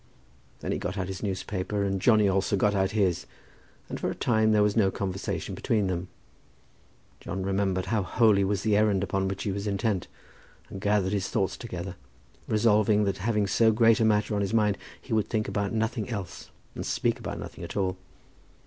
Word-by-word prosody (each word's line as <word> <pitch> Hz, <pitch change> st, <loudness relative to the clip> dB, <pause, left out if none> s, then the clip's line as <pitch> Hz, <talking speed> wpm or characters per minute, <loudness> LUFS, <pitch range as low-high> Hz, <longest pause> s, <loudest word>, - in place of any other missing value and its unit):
Then -, -, -3 dB
he -, -, -1 dB
got 90 Hz, +3 st, -4 dB
out 95 Hz, -1 st, -2 dB
his 95 Hz, -1 st, -5 dB
newspaper, 95 Hz, 0 st, -2 dB
and 95 Hz, -1 st, -1 dB
Johnny 110 Hz, -2 st, +5 dB
also 100 Hz, +1 st, +1 dB
got 105 Hz, +1 st, +2 dB
out 95 Hz, -1 st, +1 dB
his, 100 Hz, -4 st, 0 dB, 0.6 s
and -, -, -5 dB
for -, -, -1 dB
a -, -, -4 dB
time 110 Hz, -2 st, +2 dB
there 105 Hz, -1 st, +4 dB
was 105 Hz, -1 st, +1 dB
no 105 Hz, -4 st, +4 dB
conversation 95 Hz, 0 st, -3 dB
between 105 Hz, -3 st, 0 dB
them. 90 Hz, -1 st, -2 dB, 1.1 s
John 95 Hz, +2 st, -4 dB
remembered 95 Hz, -1 st, 0 dB
how 110 Hz, -2 st, 0 dB
holy 100 Hz, +1 st, +3 dB
was 100 Hz, 0 st, 0 dB
the 105 Hz, -1 st, +2 dB
errand 105 Hz, -2 st, +3 dB
upon 95 Hz, -1 st, -1 dB
which 95 Hz, 0 st, -3 dB
he 100 Hz, -, -1 dB
was 100 Hz, +2 st, -3 dB
intent, 100 Hz, -1 st, -1 dB, 0.6 s
and 95 Hz, -, -7 dB
gathered 100 Hz, -2 st, +1 dB
his 100 Hz, -2 st, -1 dB
thoughts 95 Hz, -1 st, 0 dB
together, 90 Hz, -5 st, -6 dB, 0.5 s
resolving 105 Hz, -1 st, +3 dB
that 100 Hz, -1 st, -1 dB
having 105 Hz, 0 st, +1 dB
so 110 Hz, +3 st, +4 dB
great 115 Hz, +1 st, +4 dB
a -, -, +3 dB
matter 105 Hz, -1 st, +2 dB
on 100 Hz, -, 0 dB
his 100 Hz, +3 st, -1 dB
mind 105 Hz, -3 st, +2 dB, 0.2 s
he 125 Hz, -, -6 dB
would 110 Hz, -2 st, +2 dB
think 110 Hz, -2 st, -1 dB
about 100 Hz, -1 st, -1 dB
nothing 110 Hz, 0 st, -1 dB
else 100 Hz, -7 st, -6 dB, 0.2 s
and -, -, -5 dB
speak -, -, 0 dB
about -, -, -5 dB
nothing -, -, -8 dB
at -, -, -6 dB
all. 95 Hz, -2 st, 0 dB
100 Hz, 195 wpm, -27 LUFS, 95-110 Hz, 1.1 s, Johnny